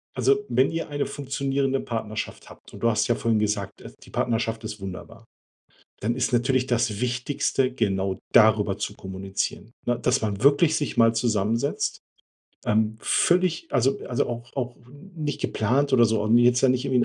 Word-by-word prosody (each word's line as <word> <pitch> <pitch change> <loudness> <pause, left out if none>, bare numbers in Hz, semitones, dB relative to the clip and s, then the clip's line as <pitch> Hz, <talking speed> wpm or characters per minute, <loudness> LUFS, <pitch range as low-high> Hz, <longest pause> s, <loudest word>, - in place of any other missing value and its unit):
Also, 135 +2 +2
wenn 125 +3 +3
ihr 165 -1 -3
eine 145 -1 -1
funktionierende 135 -1 -1
Partnerschaft 110 -3 -5
habt - - -16
und - - -10
du 115 - +3
hast 110 - +1
ja 120 - +2
vorhin 115 -2 +1
gesagt: 105 -2 -1 0.3
„Die - - -16
Partnerschaft 115 -1 -1
ist 110 0 -6
wunderbar“, 95 -2 -9 0.7
dann 115 +3 -1
ist 130 0 -1
natürlich 125 +2 +2
das 115 -4 0
Wichtigste, 125 +1 0
genau 95 -5 -1 0.2
darüber - - +5
zu - - -4
kommunizieren, 95 +3 -4
ne? 120 -1 0
Dass 125 - +1
man 105 0 -2
wirklich 145 +3 +5
sich 145 -4 -2
mal 115 -1 +5
zusammensetzt, 115 +3 0 0.7
ähm, 110 +1 +1
völlig 175 +2 +1
also 135 +1 +2
also, 125 - 0
auch 120 0 -6
auch 125 -3 -3
n 145 +9 -15
nicht 150 -3 -3
geplant 135 +6 0
oder 120 -2 +6
so 110 -1 +1
und 110 +3 +4
jetzt 120 +1 +4
da 135 - +6
nicht 130 +1 +1
irgendwie 125 -3 +2
120 Hz, 175 wpm, -25 LUFS, 110-135 Hz, 0.7 s, oder